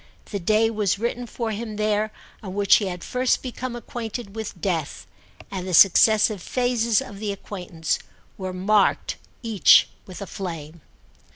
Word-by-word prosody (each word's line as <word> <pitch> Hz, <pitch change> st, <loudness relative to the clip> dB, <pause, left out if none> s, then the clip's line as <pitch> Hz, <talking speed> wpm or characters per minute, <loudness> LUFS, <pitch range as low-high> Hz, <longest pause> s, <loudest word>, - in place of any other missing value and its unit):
The 200 Hz, -, -2 dB
day 215 Hz, +5 st, +2 dB
was 210 Hz, -3 st, 0 dB
written 240 Hz, +2 st, -3 dB
for 230 Hz, 0 st, -3 dB
him 215 Hz, 0 st, -5 dB
there 215 Hz, 0 st, 0 dB, 0.3 s
on 190 Hz, -2 st, -7 dB
which 200 Hz, -1 st, +5 dB
he 205 Hz, -, -2 dB
had 180 Hz, -1 st, -5 dB
first 250 Hz, 0 st, 0 dB
become 255 Hz, -1 st, -5 dB
acquainted 230 Hz, -3 st, -6 dB
with 220 Hz, -4 st, -6 dB
death, 165 Hz, -5 st, -2 dB, 0.5 s
and 185 Hz, -1 st, -4 dB
the 180 Hz, -, +1 dB
successive 210 Hz, +2 st, +6 dB
phases 235 Hz, -1 st, +1 dB
of 200 Hz, -, -10 dB
the 210 Hz, -1 st, -2 dB
acquaintance 180 Hz, -5 st, -4 dB, 0.4 s
were 185 Hz, -1 st, -5 dB
marked 195 Hz, +3 st, +1 dB, 0.3 s
each 225 Hz, -4 st, +5 dB, 0.2 s
with 185 Hz, -2 st, -9 dB
a 200 Hz, -, -5 dB
flame. 165 Hz, -4 st, -7 dB
210 Hz, 155 wpm, -24 LUFS, 185-225 Hz, 0.5 s, successive